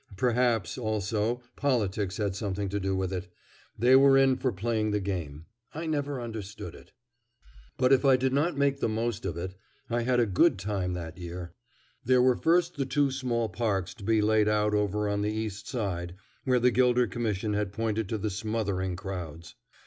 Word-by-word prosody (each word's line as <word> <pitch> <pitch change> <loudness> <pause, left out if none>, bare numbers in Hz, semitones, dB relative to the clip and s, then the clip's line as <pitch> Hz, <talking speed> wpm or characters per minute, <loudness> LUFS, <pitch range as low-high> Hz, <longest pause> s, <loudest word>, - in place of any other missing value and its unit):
Perhaps, 120 0 +1
also, 110 +2 -1
politics 105 -7 0
had 100 -3 -1
something 100 -1 -3
to 100 +2 -2
do 95 0 -1
with 95 0 -2
it. 90 0 -4 0.5
They 125 +4 +5
were 135 0 +7
in 135 -1 +5
for 130 0 -1
playing 110 +2 -1
the 105 0 +1
game. 85 -6 -4 0.3
I 160 +2 -4
never 145 -3 -2
understood 110 -3 -6
it. - - -15 0.9
But 130 +1 +4
if 135 - +4
I 135 -2 +6
did 130 +1 0
not 150 +2 +1
make 140 -1 +2
the - - 0
most 115 -2 -2
of 85 - -4
it, 90 +2 -4 0.4
I 120 0 +1
had 125 +1 +2
a 120 - +4
good 95 -1 +3
time 95 -2 -2
that 85 0 -6
year. 85 0 -7 0.5
There 130 0 +4
were 125 0 +5
first 170 +3 +2
the 135 - 0
two 145 -1 +2
small 125 -4 -1
parks 105 -5 -1
to 110 - -13
be 110 +1 +2
laid 110 0 +3
out 105 0 +2
over 105 0 +1
on 100 0 0
the 105 - 0
East 110 -1 -4
Side, 90 -7 -3 0.3
where 130 -2 +3
the 125 +1 +4
Gilder 125 0 +3
Commission 105 -1 -2
had 105 -2 -1
pointed 110 -1 -2
to 110 - -1
the 105 0 -2
smothering 100 -3 -2
crowds. 85 -4 -7
110 Hz, 190 wpm, -28 LUFS, 95-125 Hz, 0.9 s, were